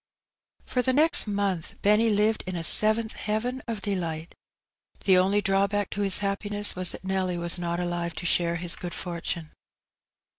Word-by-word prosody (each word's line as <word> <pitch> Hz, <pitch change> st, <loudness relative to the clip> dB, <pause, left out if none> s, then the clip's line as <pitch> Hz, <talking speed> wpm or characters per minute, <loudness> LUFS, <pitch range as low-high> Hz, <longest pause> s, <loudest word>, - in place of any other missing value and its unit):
For 250 Hz, -, -1 dB
the 255 Hz, +1 st, 0 dB
next 310 Hz, +4 st, +5 dB
montli 200 Hz, -5 st, -3 dB
Benny 210 Hz, +3 st, +3 dB
lived 215 Hz, +1 st, +1 dB
in 185 Hz, -, -4 dB
a 170 Hz, -, -4 dB
seventh 220 Hz, +5 st, +4 dB
heaven 240 Hz, +5 st, -3 dB
of 225 Hz, -3 st, -5 dB
delight. 170 Hz, -5 st, -4 dB, 0.7 s
The 185 Hz, -2 st, +4 dB
only 200 Hz, +3 st, +1 dB
drawback 200 Hz, +1 st, 0 dB
to 205 Hz, -, -4 dB
his 195 Hz, -2 st, +6 dB
happiness 205 Hz, +1 st, 0 dB
was 180 Hz, -1 st, -2 dB
that -, -, -9 dB
Nelly 190 Hz, -2 st, -2 dB
was 170 Hz, +1 st, +1 dB
not 170 Hz, 0 st, -3 dB
alive 175 Hz, -2 st, -3 dB
to -, -, -6 dB
share 170 Hz, 0 st, +1 dB
his 170 Hz, 0 st, -1 dB
good 175 Hz, -1 st, -7 dB
fortune. 170 Hz, -2 st, -5 dB
195 Hz, 165 wpm, -25 LUFS, 175-210 Hz, 0.7 s, his